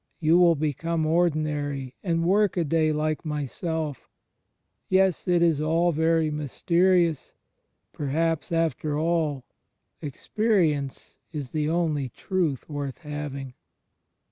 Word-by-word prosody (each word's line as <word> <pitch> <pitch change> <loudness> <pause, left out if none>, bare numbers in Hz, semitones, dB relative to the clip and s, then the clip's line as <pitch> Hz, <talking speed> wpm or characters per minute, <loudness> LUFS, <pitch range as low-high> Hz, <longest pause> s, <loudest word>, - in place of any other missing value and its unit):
You 165 +2 +4
will 170 -2 +6
become 155 +2 -1
ordinary 150 -5 0
and 165 -3 0
workaday 170 -5 +2
like 155 +1 -1
myself... 150 0 -3
• - - -32 0.9
Yes, 190 -1 +2
it 175 -1 +3
is 160 -3 +3
all 165 +3 +2
very 160 0 +2
mysterious. 170 +2 +1 0.6
Perhaps, 160 +4 -1
after 155 -3 0
all, 155 -4 0 0.6
experi 185 - +1
ence 140 -2 -8
is 145 -6 -5
the 155 -1 0
only 155 -5 0
truth 165 -1 -2
worth 145 -3 -4
having." 145 -3 -5
155 Hz, 110 wpm, -26 LUFS, 145-170 Hz, 0.9 s, will